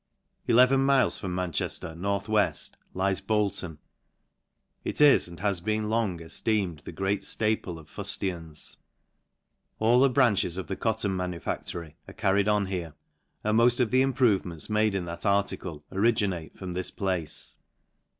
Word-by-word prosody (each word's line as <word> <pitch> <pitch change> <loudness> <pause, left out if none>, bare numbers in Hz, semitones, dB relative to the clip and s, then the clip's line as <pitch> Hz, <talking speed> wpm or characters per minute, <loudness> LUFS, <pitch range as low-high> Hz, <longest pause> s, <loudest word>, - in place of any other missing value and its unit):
Eleven 130 +3 +5
miles 135 -1 +3
from 90 -3 -4
Manchefter, 85 -2 -3
north 100 +4 -2
weft,. 110 -1 +1 0.2
lies... 95 0 +1
Bolton. 100 -6 -1 1.1
It - - -2
is, 145 -8 +6
and 85 -1 -11
has 100 -4 0
been 110 +2 -1
long, 110 -5 0
efteeme.d 85 0 -2
the - - -6
great 95 +1 -1
ftaple 105 -5 0
of 80 -2 -13
fuftians. 85 -4 -4 1.0
All 115 +3 +4
the 135 +1 +5
branches 115 -9 +2
of 95 - -3
the 95 - -4
cotton 110 -3 0
manufactory 85 -2 -4
are. - - -11
carried 100 +1 +2
on 105 -1 +2
here, 90 -5 -4 0.5
and 105 +1 +3
moft 120 +1 +4
of 120 -4 +2
the, 130 +1 +4
improvements 110 - +1
made 105 -1 +2
in 95 -2 -1
that 85 0 -7
article, 100 -6 -1
originate 100 -5 0
from 95 -2 -6
this 90 0 -1
place. 90 -5 -2
100 Hz, 145 wpm, -27 LUFS, 90-110 Hz, 1.1 s, is